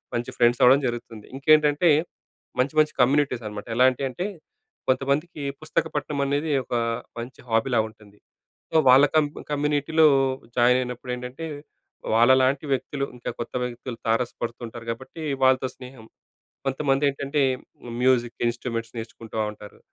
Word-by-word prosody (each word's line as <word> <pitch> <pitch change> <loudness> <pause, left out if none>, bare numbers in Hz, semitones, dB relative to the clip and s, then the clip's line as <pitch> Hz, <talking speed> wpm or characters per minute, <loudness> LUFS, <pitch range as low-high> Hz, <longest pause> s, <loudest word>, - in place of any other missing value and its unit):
మంచి 120 0 -3
ఫ్రెండ్స్ 120 +1 +3
అవ్వడం 130 +3 +7
జరుగుతుంది. 120 -3 -6
ఇంకేంటంటే, 150 +3 +4 0.7
మంచి 130 +3 +1
మంచి 155 0 +3
కమ్యూనిటీస్ 130 -1 +2
అన్నామాట. 105 +1 -7
ఎలాంటి 130 +2 +4
అంటే, 175 +9 -4 0.6
కొంతమందికి 140 +5 0 0.2
పుస్తక 155 - 0
పఠనం 145 0 -2
అనేది, 145 +3 0
ఒక 120 - -4 0.4
మంచి 120 +2 -8
హాబీలా 115 +2 +2
ఉంటుంది. 105 -2 -19 0.6
సో, - - +2
వాళ్ళ 130 +3 +8
కం 155 -1 +5 0.3
కమ్యూనిటీలో 150 +2 +2 0.5
జాయిన్ 125 +1 +5
అయినప్పుడు. 125 0 -6
ఏంటంటే, 125 +6 -7 0.7
వాళ్ళలాంటి 130 +4 +4
వ్యక్తులు 140 +1 -1
ఇంకా 120 - -5
కొత్త 120 - -6
వ్యక్తులు 125 0 -6
తారసపడుతుంటారు 115 0 -2
కాబట్టి, 130 +7 -7 0.2
వాళ్ళతో 130 0 +4
స్నేహం. 125 -3 -12 0.6
కొంతమందేంటంటే, 140 +1 0 0.6
మ్యూజిక్ 125 -2 +2
ఇన్స్ట్రుమెంట్స్‌ని 115 -1 -4
నేర్చుకుంటా 110 0 -7
ఉంటారు. 105 -1 -13
130 Hz, 120 wpm, -24 LUFS, 120-140 Hz, 0.7 s, వాళ్ళ